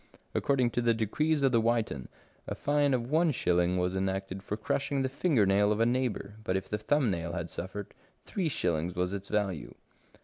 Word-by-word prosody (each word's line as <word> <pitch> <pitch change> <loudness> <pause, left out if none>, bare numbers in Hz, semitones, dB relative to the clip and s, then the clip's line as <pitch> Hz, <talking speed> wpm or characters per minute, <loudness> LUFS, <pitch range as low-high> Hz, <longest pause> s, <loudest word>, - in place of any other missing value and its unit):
According 130 -4 +2
to 120 - 0
the 120 -1 +3
decrees 145 +8 +1
of 135 - +4
the 115 -2 +4
Witan, 110 - 0 0.4
a - - -3
fine 145 -2 +2
of 120 +1 -3
one 165 +2 +4
shilling 90 - +2
was 90 +1 0
enacted 95 0 -2
for 105 - -4
crushing 135 +5 -1
the 130 - 0
finger 135 - +2
nail 100 +2 +3
of 105 - 0
a 115 - +4
neighbour, 120 -4 -1
but 95 -2 0
if 95 - -5
the 105 - -2
thumb 135 0 +2
nail 85 -1 -3
had 85 -1 -4
suffered, 95 +3 -6 0.3
three 180 -5 -1
shillings 85 - -1
was 90 +1 -1
its 100 -1 -5
value. 100 -6 -1
105 Hz, 200 wpm, -30 LUFS, 95-130 Hz, 0.4 s, of